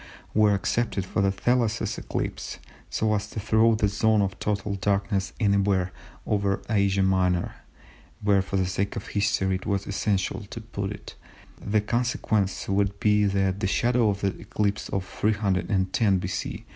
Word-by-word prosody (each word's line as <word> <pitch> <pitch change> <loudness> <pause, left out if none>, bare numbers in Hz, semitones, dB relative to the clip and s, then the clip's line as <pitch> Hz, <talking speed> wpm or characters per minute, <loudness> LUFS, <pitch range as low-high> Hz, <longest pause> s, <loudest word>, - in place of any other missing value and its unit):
were 105 -1 +4
accepted 100 -1 -1
for 95 - -1
the 100 0 +3
Thales 115 +2 +1 0.2
eclipse, - - -4 0.3
so 110 -1 +1
as 105 0 -2
to 110 - -5
throw 110 +2 +3
the 105 -1 +2
zone 105 +1 +2
of 95 0 -3
total 100 -1 -1
darkness 100 0 0
anywhere 100 -3 +2 0.3
over 100 -1 +1
Asia 100 -2 +2
Minor 90 -2 +1 0.7
(where 100 -1 +3
for 95 +1 -3
the 95 - +2
sake 100 +2 -2
of - - -6
history 100 -2 +1
it 95 0 -4
was 100 -1 0
essential 100 -1 -1
to - - -6
put 100 -3 -5
it) 105 - -9 0.5
the 105 +1 +2
consequence 110 -3 0
would 100 0 0
be 105 -1 +3
that 95 -1 +1
the 95 - 0
shadow 120 +2 +2
of 100 0 -2
the 100 -1 0
eclipse 100 -1 -2
of 95 -1 -2
310 100 -1 +1
B.C. 90 0 -4
100 Hz, 160 wpm, -26 LUFS, 95-105 Hz, 0.7 s, were